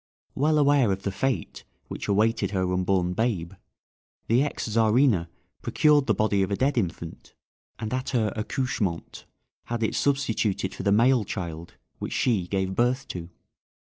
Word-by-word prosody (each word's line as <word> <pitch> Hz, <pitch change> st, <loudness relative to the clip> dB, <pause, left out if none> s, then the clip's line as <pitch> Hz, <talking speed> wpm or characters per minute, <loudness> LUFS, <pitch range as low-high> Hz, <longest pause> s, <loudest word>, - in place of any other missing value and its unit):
Well 155 Hz, +3 st, +2 dB
aware 140 Hz, -6 st, +4 dB
of 95 Hz, 0 st, -3 dB
the 100 Hz, -, -1 dB
fate 95 Hz, -, -2 dB, 0.2 s
which -, -, -6 dB
awaited 105 Hz, 0 st, +2 dB
her 95 Hz, -2 st, -1 dB
unborn 90 Hz, -1 st, +1 dB
babe, 100 Hz, -5 st, -1 dB, 0.7 s
the 120 Hz, +3 st, +3 dB
ex 145 Hz, -3 st, -2 dB
Czarina 110 Hz, -4 st, +3 dB, 0.3 s
procured 150 Hz, -3 st, +3 dB
the 110 Hz, -, +3 dB
body 105 Hz, -1 st, +1 dB
of 95 Hz, -, 0 dB
a 100 Hz, -, 0 dB
dead 135 Hz, +6 st, +1 dB
infant, 85 Hz, -6 st, -4 dB, 0.4 s
and 110 Hz, +1 st, -4 dB
at 130 Hz, 0 st, -2 dB
her 115 Hz, -5 st, 0 dB
accouchement 110 Hz, -, -3 dB, 0.4 s
had 120 Hz, -1 st, -3 dB
it 110 Hz, -, 0 dB
substituted 110 Hz, -9 st, 0 dB
for -, -, -7 dB
the 100 Hz, -, +1 dB
male 120 Hz, +3 st, +4 dB
child 85 Hz, -4 st, -6 dB, 0.2 s
which -, -, -4 dB
she 105 Hz, -9 st, +1 dB
gave 95 Hz, -1 st, -1 dB
birth 125 Hz, +5 st, +1 dB
to. 85 Hz, -1 st, -6 dB
110 Hz, 155 wpm, -26 LUFS, 95-125 Hz, 0.7 s, aware